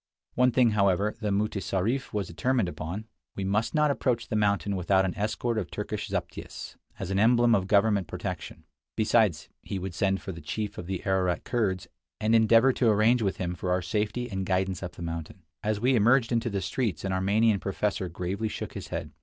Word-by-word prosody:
One 125 0 +4
thing, 125 -2 +4
however, 100 0 +2
the 105 - -1
mutessarif 105 +4 -1
was 105 -2 -1
determined 115 +6 0
upon: 85 +5 -5 0.3
we 100 - -3
must 105 +8 0
not 150 -1 +4
approach 120 -2 -1
the - - -1
mountain 100 -1 +1
without 95 +1 +2
an 95 - -2
escort 110 +2 -1
of 90 -5 -4
Turkish - - -4
zaptiehs, - - -5 0.2
as 95 - -4
an 95 - +1
emblem 120 +2 +5
of 95 -4 +2
government 100 -2 +3
protection. - - -6 0.3
Besides, 105 -7 +2
he 100 - -5
would 95 -1 -5
send 95 +2 +1
for 95 - -6
the 85 -2 -9
chief 105 -2 -4
of 85 - -7
the 95 -2 -4
Ararat 95 -2 +1
Kurds, 100 -7 -1 0.3
and 110 +1 +1
endeavor 115 +3 +5
to 120 -2 +2
arrange 110 +3 +4
with 100 -3 0
him 90 -1 -2
for 90 +1 -4
our 90 0 +1
safety 105 +6 -1
and 95 -4 -3
guidance 95 0 0
up 90 -2 -5
the 85 - -8
mountain. 85 +2 -6 0.2
As 105 -1 -1
we 125 +4 +3
emerged 120 +2 +4
into 120 0 +1
the 100 -2 -2
streets 100 +2 -2
an 95 - -1
Armenian 100 +3 +2
professor 100 -1 -2
gravely 90 +5 -3
shook 105 - -5
his - - -7
head. - - -5
100 Hz, 200 wpm, -27 LUFS, 95-115 Hz, 0.3 s, emblem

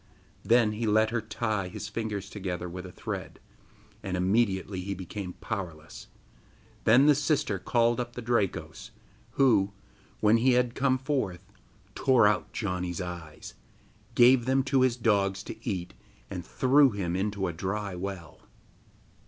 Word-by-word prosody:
Then 115 -2 +4
he 110 +2 -3
let 110 +1 +3
her 120 -1 0
tie 110 -2 -2
his 90 - -7
fingers 105 -4 -4
together 95 -4 -5
with 90 +2 -7
a - - -11
thread, - - -6 0.6
and 90 -1 -3
immediately 95 -1 +1
he 100 +2 -4
became 95 0 -6
powerless. 85 -8 -7 0.8
Then 125 +5 +6
the 150 - +7
sister 140 - 0
called 120 +3 +2
up 120 -1 -4
the 125 - -6
Drakos, 100 -7 -2 0.4
who, 105 -8 +3 0.5
when 110 +2 +4
he 125 +2 +3
had 125 -1 +2
come 130 -1 +2
forth, 125 - -2 0.5
tore 130 -5 +4
out 105 +1 +1
Janni's 90 -4 -3
eyes, 85 -4 -7 0.6
gave 120 0 +6
them 130 +1 +2
to 135 0 +2
his 130 -2 +2
dogs 100 -4 +1
to - - -7
eat, 90 -3 -4 0.4
and 90 -3 -5
threw 135 +6 +4
him 95 -6 -3
into 100 0 -1
a 85 - -2
dry 95 +4 -3
well. 90 -3 -6
105 Hz, 145 wpm, -28 LUFS, 95-120 Hz, 0.8 s, the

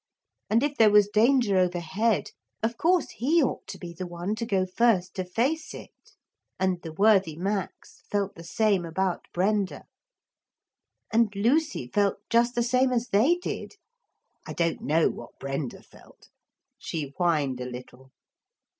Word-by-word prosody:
And 225 +5 +3
if 290 -1 -1
there 220 -1 +6
was 205 -1 +5
danger 230 -2 +4
overhead, 180 +5 0 0.3
of 230 +1 0
course 345 +5 +1
he 305 +7 +2
ought - - -3
to - - -7
be 175 -1 -8
the 180 +2 -6
one 175 +3 -4
to 230 0 -3
go 190 -4 +1
first 185 -1 +1
to 185 - -3
face 260 - -1
it. - - -10 0.7
And 185 -2 0
the 165 - -7
worthy 195 -2 +3
Max 195 +3 -4
felt 200 -1 -1
the 165 - -12
same 200 +1 +1
about 175 +2 -2
Brenda. 195 +1 0 1.3
And 225 -2 +3
Lucy 260 - +1
felt 200 +10 +1
just 235 +1 +3
the 240 - +2
same 255 +2 +2
as 245 -1 -1
they 230 +13 +4
did. 355 - -6 0.7
I - - -5
don't 170 -1 -1
know 160 +3 +2
what - - -7
Brenda 135 -1 -4
felt. - - -20 0.5
She 145 -4 -5
whined 150 -8 0
a - - -3
little. 125 +1 -11
200 Hz, 155 wpm, -26 LUFS, 175-235 Hz, 1.3 s, there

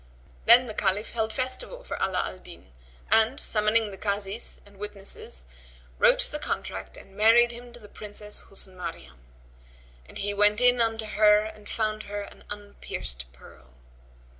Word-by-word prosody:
Then 250 +2 +9
the 220 - -6
Caliph 205 +1 0
held 220 -2 -1
festival 255 - -2
for - - -5
Ala 185 -1 +1
al - - -8
Din 65 - -14 0.4
and, 225 +4 +4
summoning 215 0 +2
the 195 - -9
Kazis 200 +1 -3
and 200 -1 -18
witnesses, 200 - -6 0.5
wrote - - +6
the - - -1
contract - - -4
and 195 - -15
married 230 +3 +6
him 240 +1 -10
to 240 - -12
the 210 - -13
Princess 210 0 -4
Husn 190 -1 -3
Maryam; 65 - -7 0.9
and - - -10
he 205 +1 -2
went 205 +1 +4
in 245 -1 +5
unto 225 -1 0
her 210 0 +5
and 215 -1 -8
found 215 -1 -1
her 205 0 -3
an 200 - -12
unpierced 65 - -6
pearl. - - -17
210 Hz, 160 wpm, -27 LUFS, 195-225 Hz, 0.9 s, Then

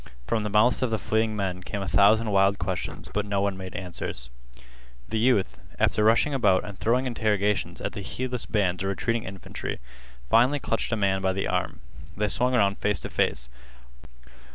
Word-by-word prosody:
From 110 - 0
the 105 - -2
mouths 105 +4 +3
of 130 - +1
the 110 - 0
fleeing 110 0 0
men 95 -3 -2
came 100 +2 -4
a - - -5
thousand 105 +3 +4
wild 100 0 +3
questions, 90 0 -3
but 105 - 0
no 100 -1 -1
one 100 -1 0
made 95 -1 -8
answers. 85 -9 -3 0.8
The 110 - -1
youth, 100 - +2 0.2
after 105 - +2
rushing 115 +6 +4
about 105 -8 +3
and 105 -2 -7
throwing 120 +6 +1
interrogations 105 -4 0
at - - -2
the 100 - -6
heedless 125 +4 -3
bands 95 -5 0
of 95 - -1
retreating 115 +4 -1
infantry, 95 0 -6 0.5
finally 125 - +4
clutched 115 -3 -2
a - - +2
man 95 -2 +1
by 95 0 +1
the 95 - -2
arm. - - -2 0.4
They 105 0 +1
swung 125 +5 +2
around 100 -3 +2
face 105 -1 +1
to - - -5
face. - - 0
105 Hz, 185 wpm, -26 LUFS, 95-115 Hz, 0.8 s, thousand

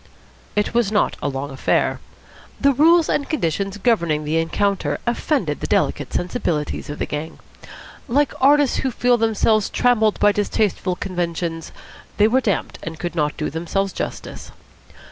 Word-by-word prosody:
It 210 +2 0
was 235 -4 +2
not 210 - +1
a - - -1
long 135 +1 -4
affair. 135 - 0 0.6
The 280 0 +4
rules 325 +4 +5
and 285 - -1
conditions 195 - -1
governing 170 -9 +1
the 155 +2 0
encounter 165 -3 0
offended 265 +4 -1
the - - -4
delicate - - 0
sensibilities 175 -8 -2
of 145 - -5
the - - -2
gang. 150 +2 -5 0.7
Like 285 +3 +1
artists 285 0 +4
who 265 - 0
feel 245 0 +2
themselves 220 -1 +2
trammelled 220 -4 +2
by 205 - +5
distasteful 200 -2 0
conventions, 170 -3 -3 0.5
they 210 - +5
were 255 +4 +2
damped 205 -6 -2
and 165 0 -6
could 175 -1 -4
not 150 -3 -1
do 155 - -2
themselves 175 +5 -2
justice. - - -6
200 Hz, 150 wpm, -21 LUFS, 165-240 Hz, 0.7 s, rules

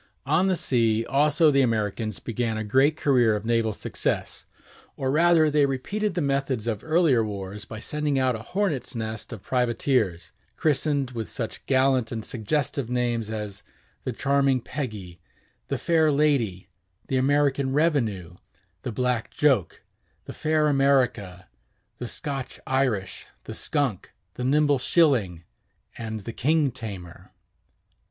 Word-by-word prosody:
] - - -45
On 160 +7 +2
the 190 - +2
sea 115 -7 +1
also 150 +4 +3
the 140 -1 +4
Americans 110 -3 -1
began 115 -1 -2
a 110 - -2
great 135 +8 +3
career 125 -8 +3
of 105 +1 -5
naval 115 -1 +1
success; - - -3 0.5
or, 130 -1 -1
rather, 160 0 +4
they 145 -1 +3
repeated 200 +10 -2
the 175 - 0
methods 135 -4 -1
of 110 -3 -2
earlier 155 -7 +3
wars 100 -1 -6
by 110 - -8
sending 150 +3 -1
out 130 -2 +2
a - - -5
hornets' 160 - -2
nest 110 0 -5
of 110 -5 -8
privateers, 120 -7 0 0.3
christened 145 -3 +1
with 115 -6 -5
such - - -5
gallant 130 -3 +2
and 110 -2 -4
suggestive 125 +2 -2
names 120 -3 -1
as 105 -3 -5 0.4
The - - -2
Charming 140 -1 +2
Peggy, 105 - -6 0.5
The - - -1
Fair 160 -2 +2
Lady, 135 -12 +1 0.4
The 135 - 0
American 140 0 +2
Revenue, 115 - 0 0.4
The 125 - -4
Black 125 0 -1
Joke, 130 - +1 0.4
The - - -7
Fair 155 -1 +1
America, 125 -10 +1 0.5
The 120 - -4
Scotch 135 +1 -4
Irish, 130 -7 -1 0.2
The - - -7
Skunk, 140 - -1 0.2
The 125 - -5
Nimble 145 +1 +3
Shilling, 120 - +2 0.5
and 110 -2 -5
The 115 +4 -7
King 150 +2 +2
Tamer. 100 -8 -9
130 Hz, 140 wpm, -25 LUFS, 110-145 Hz, 0.5 s, the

